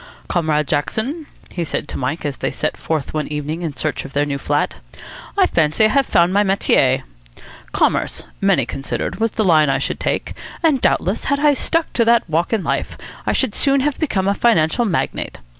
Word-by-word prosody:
"Comrade 155 -4 0
Jackson," 255 - -2 0.2
he 175 - -3
said 160 - -3
to - - -4
Mike, 135 +6 -3
as 140 -3 -3
they - - -1
set - - -2
forth 155 -3 -3
one 155 -1 -2
evening 150 +2 -4
in 160 -5 -4
search 150 +2 -2
of 135 - -10
their 145 +1 +1
new 140 -1 -3
flat, 145 +1 -1 0.6
"I 385 - +6
fancy 160 - +2
I - - +4
have 275 +2 +2
found 170 +2 +3
my 200 - +4
metier. 190 -9 +2 0.7
Commerce, - - 0 0.2
many 195 -10 +3
considered, 135 - -4
was 225 +1 +2
the 220 - -1
line 155 -6 +4
I 135 - +2
should 135 - -3
take; - - -2 0.3
and 300 -6 +3
doubtless, 190 +5 +1
had 280 +1 +1
I 295 0 +4
stuck 330 +4 -1
to 230 - +2
that 235 -3 +3
walk 165 +1 0
in 220 -5 0
life, - - -2 0.3
I - - +2
should 260 -6 0
soon 275 -1 +2
have 290 0 -1
become 200 - 0
a 200 - +3
financial 225 0 +2
magnate. 185 -7 -2
175 Hz, 200 wpm, -19 LUFS, 150-235 Hz, 0.7 s, I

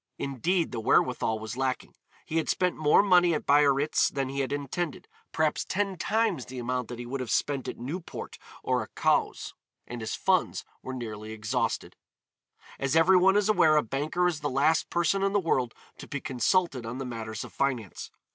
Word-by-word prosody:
Indeed 165 +7 -1
the 120 - -3
wherewithal 115 0 +2
was 110 +1 -6
lacking. 130 0 -2 0.3
He 160 - -2
had 160 - 0
spent 180 -1 +1
more 155 +5 +4
money 180 -4 +4
at - - -4
Biarritz 145 0 +3
than 135 -1 -2
he 140 +1 -4
had 135 -1 -1
intended, 145 +4 -3 0.2
perhaps 155 -1 +1
ten 195 0 -1
times 215 - 0
the 130 - -9
amount 125 0 -2
that 120 - -7
he 120 - -6
would 135 +3 -4
have 125 -3 -4
spent 140 -3 0
at - - -5
Newport 160 +9 -6 0.2
or - - +1
at - - -10
Cowes, - - 0 0.3
and 120 -1 -7
his 110 - -3
funds 185 -2 +1 0.2
were 130 - -6
nearly 110 -3 -6
exhausted. 110 -1 -2 0.8
As 135 +2 0
every 180 +3 +6
one 190 +2 +5
is 205 -1 +2
aware 160 -8 +4
a 150 - +3
banker 150 +9 0
is 170 -4 -1
the 145 -1 -2
last 145 +4 +2
person 175 +3 +1
in 195 0 +1
the 205 - +4
world 130 - 0 0.2
to - - -9
be 145 - -4
consulted 135 +2 0
on 115 +2 -5
matters 110 -2 -5
of - - -11
finance. 125 -8 -2
140 Hz, 190 wpm, -28 LUFS, 125-175 Hz, 0.8 s, every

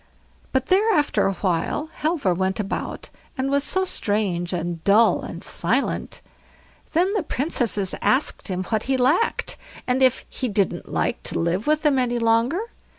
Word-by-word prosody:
But 265 -1 +1
there 405 +7 +3
after 295 -8 +2
a 195 - 0
while, 190 - -1
Halvor 305 - +1
went 190 +2 -1
about, 200 -2 -4 0.3
and 265 +1 -1
was 280 0 +2
so 375 +5 +1
strange 200 - -1
and 170 -2 -3
dull 215 +3 +4
and - - -7
silent. - - -1 0.7
Then 360 +5 +2
the 420 - +1
Princesses 240 - -1
asked 270 +4 +1
him 185 -2 -2
what 215 +3 -1
he 265 - +3
lacked, 290 - +1 0.3
and 255 +1 0
if 260 -1 +3
he 255 - -3
didn't 200 -2 -1
like - - -1
to - - -2
live 170 - -1
with 305 0 +2
them 290 -4 +3
any 245 -1 0
longer? 230 - +2
245 Hz, 160 wpm, -23 LUFS, 195-295 Hz, 0.7 s, dull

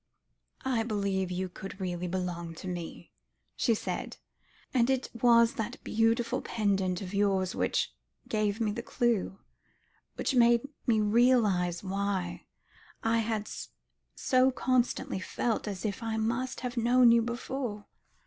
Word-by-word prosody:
"I 255 -4 +1
believe 200 -4 -1
you 185 +1 -2
could 195 +2 -9
really 180 -1 -3
belong 175 -2 -3
to 185 - -8
me," 175 -2 -6 0.4
she 230 - +2
said, - - -4 0.6
"and 245 -2 +3
it 265 -1 0
was 235 0 +5
that 235 +3 -3
beautiful 225 +1 +1
pendant 195 -4 0
of 185 +1 -7
yours 195 -2 +1
which - - 0 0.3
gave 215 -1 0
me 220 -2 +1
the 235 +3 -4
clue, 230 -5 0 0.8
which - - -1
made 235 -1 +5 0.3
me 220 -3 +4
realise 210 -6 +3
why 195 -2 -2 0.6
I 225 0 +2
had 220 -1 -1 0.7
so 255 0 +3
constantly 255 -6 0
felt 220 +4 -2
as 200 0 -4
if 200 0 -2
I 225 -1 -2
must 235 +4 -1
have 250 -1 -4
known 240 +1 +5
you 235 0 +5
before. 240 -2 -4
220 Hz, 135 wpm, -30 LUFS, 190-235 Hz, 0.8 s, was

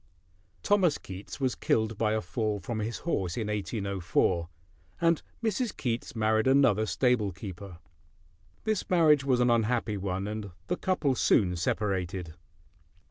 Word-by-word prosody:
Thomas 190 -7 +3
Keats 95 +7 -9
was 130 -2 +1
killed 110 0 0
by 110 0 +1
a 110 - 0
fall 105 +3 -2
from 110 +4 -4
his 110 +2 -3
horse 95 - -1
in 110 -3 -2
1804, 95 -4 0 0.5
and 165 -1 +3 0.2
Mrs. 225 0 -1
Keats 120 -1 -3
married 110 +1 +2
another 125 -6 +4
stable 125 -6 +2
keeper. 95 -1 -8 0.9
This 215 -3 -1
marriage 155 -6 +5
was 130 -3 +2
an 125 -1 +4
unhappy 115 -2 +1
one, 95 0 -3
and 105 -1 -4 0.2
the 180 - -1
couple 160 -7 +1
soon 95 -7 +3
separated. 90 -2 -2
110 Hz, 135 wpm, -29 LUFS, 100-130 Hz, 0.9 s, marriage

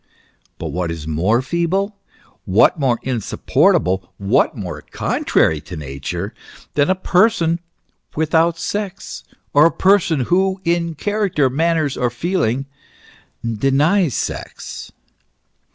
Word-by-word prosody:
But 80 - -5
what 85 +3 -2
is 80 -2 -5
more 95 +11 +1
feeble, 175 +7 -1 0.5
what 105 - +4
more 130 -4 +2
insupportable, 95 -6 +1
what 100 0 +1
more - - -5
contrary 80 -2 0
to 90 - -9
Nature 75 - -5 0.4
than 145 +2 +2
a 185 - +3
person 180 -3 +2 0.6
without 160 +2 +2
sex, 195 +3 -4 0.3
or 145 +3 +7
a - - 0
person, 185 -6 +3
who 190 +7 +1
in 170 -1 0
character, 195 -8 0
manners, 160 -1 +1
or 125 - +1
feelings, 135 -2 -1 0.9
denies 145 - +2
sex - - -5
150 Hz, 110 wpm, -19 LUFS, 110-175 Hz, 0.9 s, or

